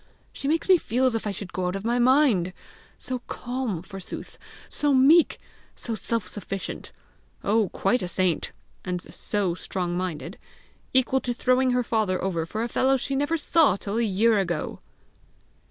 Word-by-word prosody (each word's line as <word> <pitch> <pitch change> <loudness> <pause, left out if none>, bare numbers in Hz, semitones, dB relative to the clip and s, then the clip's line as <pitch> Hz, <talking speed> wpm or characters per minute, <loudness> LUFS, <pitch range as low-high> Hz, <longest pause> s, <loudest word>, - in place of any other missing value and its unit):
She 275 - -5
makes 320 +3 +1
me 370 -2 +6
feel 255 0 0
as 255 - +3
if 225 -1 -2
I - - 0
should 195 -1 -7
go 185 -1 -1
out 180 - -2
of 195 +2 -5
my 240 +1 +1
mind! 245 - +4 0.4
so 255 -1 -4
calm, 245 -8 -3
forsooth! 195 -1 -8 0.3
so 290 -2 +1
meek! 295 +6 +5 0.4
so 235 - -5
self 225 -2 -2
sufficient! 195 -1 -6 0.5
oh, 210 -1 +2
quite 240 +10 +1
a 180 - -2
saint! 180 -1 0 0.3
and 180 -1 -2
so 200 -4 -1
strong 175 0 -3
minded! 180 -1 -4 0.5
equal 260 0 +3
to 245 -1 -2
throwing 255 +1 +2
her 250 0 +2
father 215 -5 0
over 170 -4 -1
for 215 +6 -3
a - - -1
fellow 265 +2 +2
she 270 +2 -2
never 290 +4 +1
saw 305 - +4
till 200 +2 -3
a - - +2
year 215 +1 +3
ago!" 175 -5 -2
220 Hz, 170 wpm, -25 LUFS, 185-260 Hz, 0.5 s, me